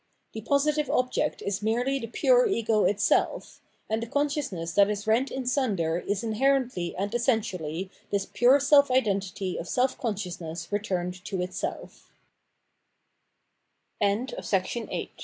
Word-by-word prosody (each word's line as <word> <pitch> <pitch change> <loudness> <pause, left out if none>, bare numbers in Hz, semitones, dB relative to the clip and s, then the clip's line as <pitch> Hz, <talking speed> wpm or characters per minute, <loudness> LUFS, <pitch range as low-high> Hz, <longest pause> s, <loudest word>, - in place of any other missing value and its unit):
The 220 - -5
positive 290 +4 +1
object 255 -3 0
is 200 0 -2
merely 245 +6 0
the 230 - -5
pure - - +3
ego 230 - +1
itself; 205 0 +1 0.3
and 220 +1 -1
the 230 - -4
consciousness 280 - -2
that 200 +2 +5
is 210 0 -3
rent 230 +5 +2
in 265 -1 -4
sunder 200 - 0
is 200 +4 -2
inherently 235 -5 0
and 200 +3 -3
essentially 195 - -1 0.2
this 200 -1 0
pure 245 +8 +4
self 285 0 +5
identity 195 -6 0
of - - -6
self 255 +1 +1
consciousness 175 -7 -4
220 Hz, 110 wpm, -27 LUFS, 195-265 Hz, 0.3 s, that